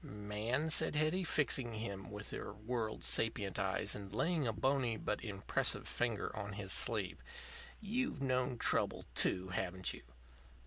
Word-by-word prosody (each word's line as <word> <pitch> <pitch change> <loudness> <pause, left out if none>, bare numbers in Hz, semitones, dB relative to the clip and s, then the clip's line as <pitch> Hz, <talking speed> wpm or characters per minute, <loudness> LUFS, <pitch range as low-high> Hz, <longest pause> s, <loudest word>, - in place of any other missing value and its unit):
"Man," 105 +9 -2
said 155 - +2
Hetty, 155 +5 +2
fixing 135 -7 +1
him 100 -4 -5
with 105 0 -6
her - - -5
world 110 +1 -3
sapient 105 -3 +1
eyes, 100 +1 +1
and 100 -2 -6
laying 155 - +1
a - - +2
bony 130 0 +1
but - - -2
impressive 100 -4 +1
finger 120 -4 -1
on 100 -1 -4
his 95 -1 -1
sleeve, - - +2 0.6
"you've 230 - -1
known 130 -2 +1
trouble, - - +2
too, 95 0 +2
haven't 90 0 -1
you?" - - -9
110 Hz, 145 wpm, -37 LUFS, 100-135 Hz, 0.6 s, said